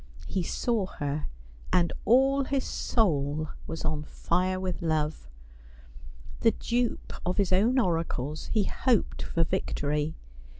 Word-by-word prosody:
He 190 - -1
saw 215 +3 0
her, 145 -3 -3 0.4
and 175 -1 +3
all 270 +3 +4
his 270 0 0
soul 155 - 0 0.2
was 160 0 -5
on 155 -1 0
fire 180 +4 0
with 185 -2 -3
love. 155 - -1 1.1
The 225 - +4
dupe 240 0 -1
of 180 +1 -1
his 195 -2 +2
own 225 +8 +4
oracles, 165 - 0
he 215 - +2
hoped 240 +2 +1
for 165 - 0
victory. 150 0 -1
175 Hz, 125 wpm, -28 LUFS, 155-225 Hz, 1.1 s, all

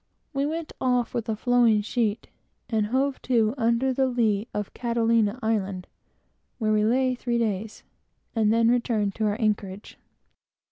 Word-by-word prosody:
We 275 +1 0
went 325 +1 -4
off 250 -2 +1
with 230 -1 -3
a 220 - 0
flowing 235 -2 +3
sheet, 220 -1 -1 0.4
and 215 -2 +1
hove 265 +4 0
to 230 -3 +2
under 235 +1 +1
the 265 +1 +1
lee 225 -4 0
of 210 -1 -4
Catalina 230 -2 +1
island, 200 -4 -1 0.7
where 215 -3 0
we 210 0 +2
lay 255 +3 +2
three 240 -1 -2
days, 220 -2 -2 0.5
and 215 -2 +3
then 230 +1 +4
returned 225 -4 0
to 220 - -2
our 210 +1 0
anchorage. 205 -3 -2
230 Hz, 150 wpm, -25 LUFS, 215-245 Hz, 0.7 s, then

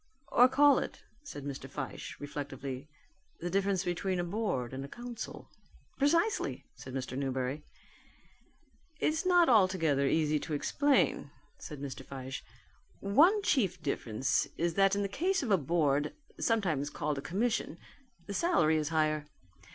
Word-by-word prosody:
"Or 250 -1 +6
call 285 +2 +5
it," - - -6 0.2
said 275 - -8
Mr. 140 -2 -6
Fyshe - - -6
reflectively, 140 -2 -6 0.5
"the 175 +1 -4
difference 195 -1 +1
between 180 +1 -1
a - - 0
board 175 - -2
and 135 +1 -4
a - - -6
council." 240 +6 -7 0.5
"Precisely," 335 +10 +1
said 130 - -9
Mr 130 -1 -4
Newberry. 130 +1 -2 1.4
"It's 320 +4 0
not 355 -2 +5
altogether 185 - +3
easy 155 0 +2
to 155 - -5
explain," 285 - +2 0.3
said 150 -3 -8
Mr. 135 -1 -6
Fyshe. 135 0 -6 0.6
"One 330 - +4
chief 195 - +1
difference 130 -2 0
is 170 0 0
that 195 +1 +4
in 205 - 0
the - - 0
case 360 - 0
of 235 - -2
a 195 - +6
board, 150 -1 +1 0.2
sometimes 170 - +1
called 150 -1 -2
a - - -5
Commission, 220 - -1 0.5
the 200 - -5
salary 190 - +3
is 150 -1 -1
higher. 155 -2 +1
170 Hz, 145 wpm, -31 LUFS, 140-230 Hz, 1.4 s, Or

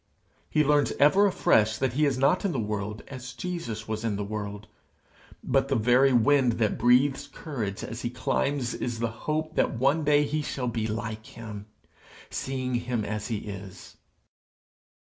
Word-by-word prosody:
He 155 - +3
learns 145 0 +3
ever 190 +9 +5
afresh 110 - +3
that 130 0 0
he 150 +3 +2
is 135 -2 0
not 140 +7 +3
in 195 -4 0
the 130 - -1
world 105 0 -3
as 125 -2 -8
Jesus 130 -10 -5
was 110 0 -3
in 110 -3 0
the 100 - -2
world; 105 0 -5 0.8
but 135 0 +2
the 135 - +1
very 125 +4 +4
wind 125 +1 +4
that 110 -2 0
breathes 135 +4 +3
courage 115 -10 -5
as 115 - -6
he 120 - -2
climbs 130 +1 -1
is 120 -2 -3
the 115 0 -1
hope 155 +6 -3
that - - +1
one 140 +6 +2
day 145 0 +4
he 150 +2 -1
shall 135 -3 -3
be 115 -2 -1
like 110 0 -4
him, 105 -2 -9 0.6
seeing 130 -1 -3
him 120 -2 -1
as 105 0 -3
he 110 -3 -2
is. 95 -2 -9
125 Hz, 170 wpm, -27 LUFS, 110-140 Hz, 0.8 s, ever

